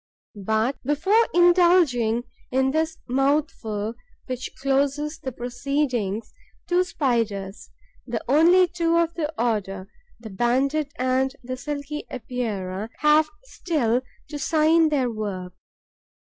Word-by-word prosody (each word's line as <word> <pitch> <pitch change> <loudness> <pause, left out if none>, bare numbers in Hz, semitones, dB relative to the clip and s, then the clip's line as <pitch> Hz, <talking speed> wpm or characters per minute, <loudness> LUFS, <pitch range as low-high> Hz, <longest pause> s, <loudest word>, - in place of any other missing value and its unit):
But, 220 +6 0
before 355 - +3
indulging 345 - +4 0.3
in 265 +1 +1
this 320 +2 -1
mouthful, 265 -6 0 0.3
which 255 0 -4
closes 280 +3 0
the 270 -4 -5
proceedings, 245 -4 -2 0.3
two 360 +1 +2
Spiders, 230 - -2 0.4
the 230 -2 -3
only 340 +7 +5
two 335 -1 +1
of 335 0 +1
the 310 -3 -2
order, 200 -4 -2 0.3
the 220 -2 -9
Banded 270 +8 +1
and 260 +1 +1
the 255 +1 -4
Silky 290 +2 -5
Epeira, 220 -5 -4
have 305 0 +5
still 290 - 0 0.3
to 295 - -5
sign 315 +3 +3
their 265 -5 +1
work. 195 -5 -5
265 Hz, 110 wpm, -24 LUFS, 230-310 Hz, 0.4 s, only